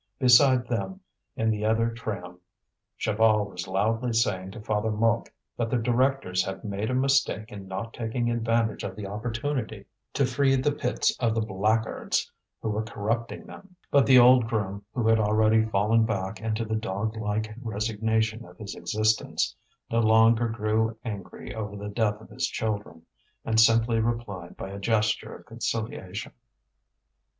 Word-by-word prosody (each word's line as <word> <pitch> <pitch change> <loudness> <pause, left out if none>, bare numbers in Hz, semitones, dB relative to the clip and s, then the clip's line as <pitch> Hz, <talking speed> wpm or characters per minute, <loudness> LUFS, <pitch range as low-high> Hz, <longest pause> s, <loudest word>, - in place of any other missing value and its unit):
Beside 130 0 +6
them, 155 +11 -3 0.4
in 110 0 +1
the 105 -1 -2
other 115 +1 +2
tram, 95 -6 -6 0.6
Chaval 110 -1 +3
was 90 -3 -7
loudly 115 +6 0
saying 95 -5 0
to 95 - -9
Father 105 0 -1
Mouque 115 +2 +1 0.3
that 115 -1 -1
the 125 - +1
directors 120 -5 +1
had 95 +3 -6
made 105 0 -3
a 130 - 0
mistake 130 -4 +1
in 100 -2 -9
not 95 +5 -5
taking 120 +1 -2
advantage 115 -1 0
of 95 -1 -5
the 105 - -6
opportunity 115 +5 -3 0.3
to 140 - +2
free 135 +1 +2
the 135 +3 +1
pits 125 -3 0
of 115 -3 +1
the 115 - +1
blackguards 110 +2 0 0.3
who 110 - -1
were 105 +1 -1
corrupting 115 - -3
them; 195 -2 -13 0.2
but 140 -1 +4
the 130 -2 +7
old 125 -1 +7
groom, 100 -3 -2
who 120 -3 -1
had 110 0 +4
already 110 +1 +3
fallen 110 +2 +2
back 105 -1 -2
into 110 0 -1
the 110 0 -2
dog 110 0 -2
like 110 0 -2
resignation 110 0 -1
of 90 -4 -15
his 100 -2 -7
existence, 110 0 0 0.4
no 115 - +2
longer 115 +1 +5
grew 110 0 0
angry 105 -4 -6
over 105 -2 -5
the 105 +1 -6
death 105 -2 0
of - - -14
his 130 0 -1
children, 105 -9 -4 0.4
and 110 0 +2
simply 115 0 +4
replied 110 -6 -3
by 95 - -6
a 100 - -6
gesture 110 +1 0
of - - -14
conciliation. 110 -4 -4
110 Hz, 160 wpm, -27 LUFS, 105-115 Hz, 0.6 s, the